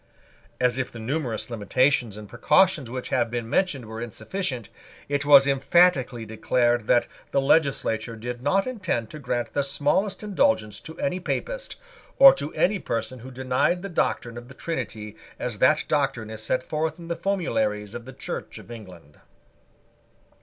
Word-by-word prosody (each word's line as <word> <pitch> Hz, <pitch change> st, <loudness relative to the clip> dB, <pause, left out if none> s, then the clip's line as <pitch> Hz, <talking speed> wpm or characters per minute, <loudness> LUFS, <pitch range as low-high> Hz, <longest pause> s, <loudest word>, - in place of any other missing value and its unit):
As 125 Hz, 0 st, +2 dB
if 130 Hz, -, -2 dB
the -, -, -10 dB
numerous 120 Hz, -1 st, -3 dB
limitations 120 Hz, 0 st, +1 dB
and 105 Hz, -1 st, -9 dB
precautions 145 Hz, -, +3 dB
which 130 Hz, +1 st, -5 dB
have 120 Hz, -3 st, +1 dB
been 120 Hz, -1 st, -3 dB
mentioned 140 Hz, -2 st, 0 dB
were 110 Hz, +1 st, -7 dB
insufficient, 125 Hz, -, -4 dB, 0.4 s
it 145 Hz, 0 st, -1 dB
was 140 Hz, -2 st, +8 dB
emphatically 135 Hz, -3 st, +3 dB
declared 120 Hz, +1 st, +1 dB
that 120 Hz, -, +3 dB, 0.2 s
the 140 Hz, -, +1 dB
legislature 135 Hz, -6 st, +1 dB
did 120 Hz, +2 st, -6 dB
not 190 Hz, +9 st, +2 dB
intend 185 Hz, -, -2 dB
to 155 Hz, -, -8 dB
grant 120 Hz, -5 st, -3 dB
the 140 Hz, -, +1 dB
smallest 165 Hz, +9 st, 0 dB
indulgence 110 Hz, -, +1 dB
to 160 Hz, -, -11 dB
any 185 Hz, 0 st, -1 dB
Papist, -, -, -3 dB, 0.4 s
or 275 Hz, 0 st, +10 dB
to 145 Hz, +2 st, -5 dB
any 200 Hz, +1 st, +2 dB
person 125 Hz, -1 st, -3 dB
who 125 Hz, +3 st, -10 dB
denied 130 Hz, +8 st, 0 dB
the 200 Hz, -, -4 dB
doctrine 120 Hz, -8 st, -1 dB
of 120 Hz, -, -14 dB
the 130 Hz, -, -13 dB
Trinity 110 Hz, -10 st, -5 dB, 0.2 s
as 115 Hz, -4 st, -4 dB
that 150 Hz, +6 st, +4 dB
doctrine 135 Hz, -7 st, 0 dB
is 110 Hz, 0 st, -7 dB
set 130 Hz, +3 st, -1 dB
forth 155 Hz, +1 st, -2 dB
in 170 Hz, -1 st, -10 dB
the 170 Hz, -, -2 dB
formularies 110 Hz, -, -1 dB
of 120 Hz, -, -7 dB
the 130 Hz, -, -10 dB
Church -, -, -6 dB
of -, -, -12 dB
England. 90 Hz, -10 st, -12 dB
130 Hz, 165 wpm, -25 LUFS, 115-160 Hz, 0.4 s, or